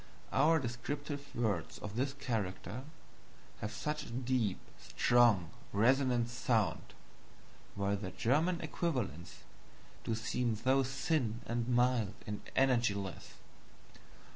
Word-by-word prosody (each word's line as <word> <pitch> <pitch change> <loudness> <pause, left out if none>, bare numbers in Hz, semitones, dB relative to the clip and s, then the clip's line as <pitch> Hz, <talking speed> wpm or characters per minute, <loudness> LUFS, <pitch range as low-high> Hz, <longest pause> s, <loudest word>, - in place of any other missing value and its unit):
Our 155 +5 +5
descriptive 140 +3 -4
words 105 -8 -1
of 105 0 -7
this 130 +3 0
character 115 -3 -3 0.7
have 105 - -3
such 150 +5 -3
a - - -10
deep, 120 -4 0 0.2
strong, 115 -8 +3 0.2
resonant 125 +2 +3
sound, 120 -3 0 0.8
while 100 0 +1
their 100 -2 -4
German 150 - +1
equivalents 130 - -3 0.6
do 115 - -1
seem 115 +1 0
so 130 +5 +3
thin 130 -3 0
and 115 0 -1
mild 120 -4 +2
and 105 0 -4
energyless. 115 -8 +1
120 Hz, 105 wpm, -34 LUFS, 105-135 Hz, 0.8 s, Our